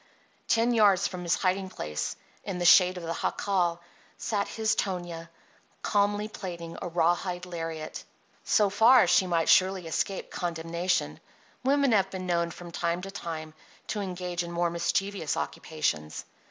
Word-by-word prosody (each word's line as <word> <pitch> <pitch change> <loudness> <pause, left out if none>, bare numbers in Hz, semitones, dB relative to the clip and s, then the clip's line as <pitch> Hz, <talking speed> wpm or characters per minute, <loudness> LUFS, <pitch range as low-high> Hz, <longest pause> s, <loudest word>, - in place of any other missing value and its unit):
Ten 230 +2 +3
yards 205 -5 +4
from 180 -1 -7
his 175 0 +1
hiding 190 0 0
place, 75 - -4 0.3
in 195 -3 -4
the 175 - -2
shade 180 +1 +7
of 175 - -7
the 165 0 -3
jacal, 175 -4 0 0.4
sat 205 -3 -1
his 220 -1 0
Tonia 175 -3 -3 0.5
calmly 205 0 +1
plaiting 170 -5 -7
a - - -3
rawhide 175 +1 0
lariat. 165 -3 -5 0.4
So 205 -2 +3
far 230 +4 +6
she 190 - +4
might 165 -2 +1
surely 185 -1 +4
escape 185 +4 -2
condemnation; 170 +1 -2 0.4
women 280 0 +3
have 195 -3 +3
been 185 -1 -6
known, 170 -1 +1
from 175 +1 -10
time 170 +1 -1
to 195 - -6
time, 160 -5 -6 0.4
to 210 - -2
engage 180 -2 -3
in 170 0 -5
more 170 0 0
mischievous 170 0 -1
occupations. 80 - -3
180 Hz, 150 wpm, -28 LUFS, 170-195 Hz, 0.5 s, shade